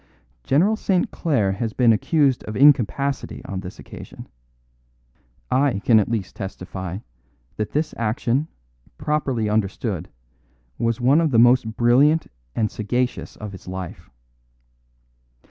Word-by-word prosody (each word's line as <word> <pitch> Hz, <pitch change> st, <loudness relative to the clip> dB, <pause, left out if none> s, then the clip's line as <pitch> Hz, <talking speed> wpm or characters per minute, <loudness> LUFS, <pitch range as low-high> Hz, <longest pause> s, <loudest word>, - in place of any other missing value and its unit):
General 180 Hz, -, +3 dB
St. 190 Hz, -4 st, 0 dB
Clare 125 Hz, -, 0 dB
has 110 Hz, +3 st, -3 dB
been 120 Hz, -3 st, +4 dB
accused 140 Hz, +3 st, +2 dB
of 110 Hz, -, -6 dB
incapacity 140 Hz, 0 st, +2 dB
on 95 Hz, -, -4 dB
this 95 Hz, +1 st, -8 dB
occasion; -, -, -11 dB, 1.2 s
I 135 Hz, -4 st, +2 dB
can 110 Hz, +2 st, +4 dB
at 105 Hz, -, 0 dB
least 110 Hz, -5 st, -3 dB
testify 95 Hz, -3 st, -6 dB, 0.6 s
that 105 Hz, -1 st, -3 dB
this 150 Hz, +1 st, -1 dB
action, 120 Hz, +5 st, 0 dB, 0.5 s
properly 135 Hz, -7 st, -1 dB
understood, 100 Hz, -3 st, -2 dB, 0.7 s
was 115 Hz, +1 st, 0 dB
one 135 Hz, +6 st, +4 dB
of 160 Hz, -, +2 dB
the 120 Hz, -, +2 dB
most 120 Hz, -1 st, +4 dB
brilliant 140 Hz, +7 st, +4 dB, 0.3 s
and 110 Hz, -2 st, 0 dB
sagacious 125 Hz, +4 st, -2 dB
of 105 Hz, -1 st, -7 dB
his 95 Hz, -, -12 dB
life. 95 Hz, -1 st, -7 dB
115 Hz, 125 wpm, -22 LUFS, 105-140 Hz, 1.2 s, been